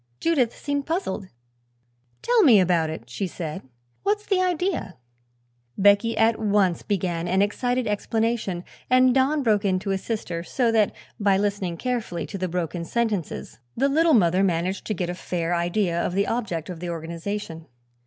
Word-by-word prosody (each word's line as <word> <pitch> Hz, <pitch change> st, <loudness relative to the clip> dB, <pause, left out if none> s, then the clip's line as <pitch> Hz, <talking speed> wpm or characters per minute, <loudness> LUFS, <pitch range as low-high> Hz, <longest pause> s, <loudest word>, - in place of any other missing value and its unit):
Judith 275 Hz, -9 st, +1 dB
seemed 285 Hz, -1 st, -2 dB
puzzled. 320 Hz, -, -2 dB, 1.0 s
"Tell 480 Hz, -1 st, +4 dB
me 250 Hz, -, +7 dB
about 175 Hz, -3 st, +2 dB
it," 155 Hz, -7 st, -7 dB
she 125 Hz, +11 st, -3 dB
said. 160 Hz, -3 st, -5 dB, 0.4 s
"What's 415 Hz, +1 st, 0 dB
the 385 Hz, -2 st, +2 dB
idea?" 360 Hz, -, -1 dB, 0.8 s
Becky 205 Hz, +3 st, +4 dB
at 225 Hz, 0 st, +3 dB
once 200 Hz, -5 st, +2 dB
began 175 Hz, -4 st, -2 dB
an 190 Hz, +3 st, +3 dB
excited 245 Hz, +4 st, 0 dB
explanation 215 Hz, -3 st, -1 dB, 0.3 s
and 255 Hz, 0 st, +5 dB
Don 275 Hz, +3 st, +2 dB
broke 215 Hz, -3 st, +2 dB
in 190 Hz, -2 st, +2 dB
to 195 Hz, +1 st, -3 dB
assist 205 Hz, +2 st, -3 dB
her, 170 Hz, -1 st, -3 dB
so 235 Hz, +7 st, 0 dB
that 220 Hz, -2 st, +3 dB, 0.3 s
by 200 Hz, -2 st, +3 dB
listening 200 Hz, -4 st, -1 dB
carefully 240 Hz, -8 st, -2 dB
to 195 Hz, -, -7 dB
the 185 Hz, -, -1 dB
broken 175 Hz, -1 st, -3 dB
sentences 210 Hz, -, -2 dB, 0.2 s
the 275 Hz, +3 st, +3 dB
Little 320 Hz, +2 st, +4 dB
Mother 180 Hz, -3 st, +3 dB
managed 185 Hz, +1 st, 0 dB
to 215 Hz, -, -1 dB
get 180 Hz, 0 st, -2 dB
a -, -, -4 dB
fair 175 Hz, -1 st, -2 dB
idea 175 Hz, 0 st, 0 dB
of -, -, -2 dB
the 200 Hz, +1 st, +2 dB
object 190 Hz, -9 st, -2 dB
of 170 Hz, -, -8 dB
the 175 Hz, 0 st, -5 dB
organization. 165 Hz, +1 st, -5 dB
200 Hz, 165 wpm, -24 LUFS, 175-240 Hz, 1.0 s, me